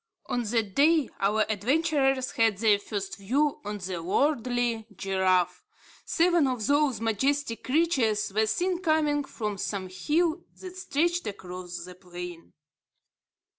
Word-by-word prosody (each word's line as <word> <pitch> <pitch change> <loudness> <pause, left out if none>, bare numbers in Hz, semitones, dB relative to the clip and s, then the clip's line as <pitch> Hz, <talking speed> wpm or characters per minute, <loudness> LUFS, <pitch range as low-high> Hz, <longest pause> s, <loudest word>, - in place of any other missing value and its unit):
On 245 - -1
that 225 -3 -1
day, 305 - +4
our 210 +2 +2
adventurers 270 +4 +1
had 225 -3 +2
their 210 -1 +4
first 200 -1 -5
view 275 +9 +1
of 205 -2 -5
the 180 -2 -4
lordly 240 - 0
giraffe. 185 -2 +1 0.4
Seven 340 -3 +3
of 250 -5 -2
those 285 -2 +2
majestic 230 +3 0
creatures 255 - +1
were 220 +1 +2
seen 360 - 0
coming 310 -4 +2
from 210 -6 -4
some 190 -3 -3
hill 315 - 0 0.2
that 370 -1 -9
stretched 345 0 0
across 180 -2 -7
the 180 - -10
plain. 180 -2 -9
230 Hz, 130 wpm, -27 LUFS, 195-295 Hz, 0.4 s, day